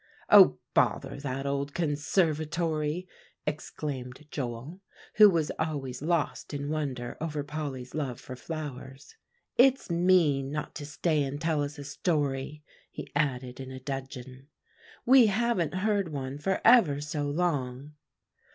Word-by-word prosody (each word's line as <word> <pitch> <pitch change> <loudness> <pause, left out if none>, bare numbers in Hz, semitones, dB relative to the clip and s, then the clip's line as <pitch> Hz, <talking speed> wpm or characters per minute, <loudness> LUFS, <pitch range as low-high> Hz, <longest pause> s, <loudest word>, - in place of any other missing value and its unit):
"Oh, - - +8 0.2
bother - - +1
that 135 -1 -4
old 140 0 -2
conservatory!" 155 +1 0 0.4
exclaimed 145 -3 -5
Joel, 130 +7 -5 0.4
who 210 -1 +10
was 165 -5 0
always 140 -5 -3
lost 160 -2 -1
in 145 0 -3
wonder 130 -6 -3
over 150 -2 -2
Polly's 145 -4 -5
love 135 -6 -3
for 130 - -8
flowers; 135 -2 -7 0.4
"it's 260 -5 +4
mean 170 -6 +3
not 150 0 -4
to 145 - -7
stay 150 +1 0
and 140 +1 -4
tell 160 -2 0
us 145 +1 -4
a 145 - -7
story," 145 -1 -2 0.3
he - - -9
added 130 -4 -1
in 130 -1 -7
a 130 0 -7
dudgeon; 130 -1 -7 0.6
"we 255 -2 +7
haven't 200 -6 0
heard 200 -2 0
one 135 -1 -4
for 190 +5 -1
ever 220 - +6
so 145 0 -3
long." 145 -4 -2
145 Hz, 135 wpm, -29 LUFS, 135-165 Hz, 0.6 s, who